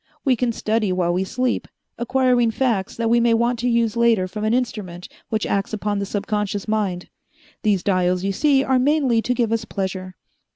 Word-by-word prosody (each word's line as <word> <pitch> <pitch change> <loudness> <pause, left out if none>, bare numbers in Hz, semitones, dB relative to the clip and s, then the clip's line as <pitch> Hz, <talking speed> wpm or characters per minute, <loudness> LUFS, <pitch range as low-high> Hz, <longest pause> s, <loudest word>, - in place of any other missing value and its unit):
We 265 -2 +4
can 245 0 0
study 215 -2 0
while 175 -1 +1
we 185 +2 0
sleep, 250 +6 -1 0.3
acquiring 250 -1 +2
facts 225 -5 -1
that 230 0 -1
we 235 +1 +4
may 235 -1 +3
want 235 +1 +1
to 245 +1 0
use 235 -2 +1
later 230 -5 +3
from 210 +3 -6
an 215 - +1
instrument 200 -8 -3 0.2
which 220 -1 -1
acts 200 +2 -1
upon 210 -1 -1
the 200 - -3
subconscious 205 0 -2
mind. 200 -5 -1 0.5
These 200 -5 +1
dials 185 -2 +1
you 195 - 0
see 275 +6 +3
are 260 -1 +2
mainly 265 -4 +2
to 250 +2 -1
give 235 -3 0
us 230 -1 0
pleasure. 190 -3 -4
220 Hz, 195 wpm, -21 LUFS, 195-240 Hz, 0.5 s, We